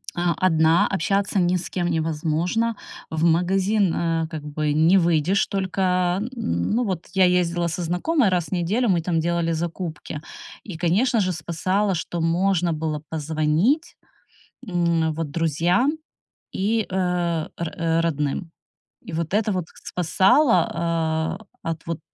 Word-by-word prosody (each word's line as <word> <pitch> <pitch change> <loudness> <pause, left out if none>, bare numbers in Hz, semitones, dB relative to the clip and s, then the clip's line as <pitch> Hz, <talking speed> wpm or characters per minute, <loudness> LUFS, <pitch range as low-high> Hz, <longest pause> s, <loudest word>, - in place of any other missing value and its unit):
А, 175 -1 +1
одна, 160 0 +4
общаться 195 +2 0
ни 180 0 +2
с 175 - -5
кем 175 -2 -1
невозможно, 165 +7 0 0.3
в 160 0 -1
магазин, 185 +3 +2
э, 165 -1 0
как 155 -3 -6
бы 150 0 -1
не 165 +5 +5
выйдешь 170 +2 +2
только, 185 -1 0
ну, 220 - -1
вот 185 -6 -3
я 190 -1 +5
ездила 175 -1 +2
со 170 +1 -3
знакомой 205 - +1
раз 180 -3 0
в - - -15
неделю, 200 +7 +1
мы 175 -3 +3
там 165 0 0
делали 170 0 0
закупки. 165 -2 -4 0.4
И, 190 -6 -7
конечно 205 +9 +2
же, 185 -2 +1
спасало, 185 +5 -1
что 170 0 -3
можно 175 +1 +1
было 155 -1 -3
позвонить, 160 - 0 0.7
м, 170 -4 +1
вот 160 -1 -4
друзьям 170 - +1 0.5
и, 215 +2 0
э, 180 -3 0
ро 165 -1 -1
родным. 160 +1 -2 0.5
И - - -10
вот 165 +2 -3
это 210 +1 +2
вот 185 -3 -2
с - - -12
спасало, 185 - +3
а, 165 -1 -1 0.2
от 165 -1 -4
вот 165 -1 -4
170 Hz, 140 wpm, -23 LUFS, 160-190 Hz, 0.7 s, не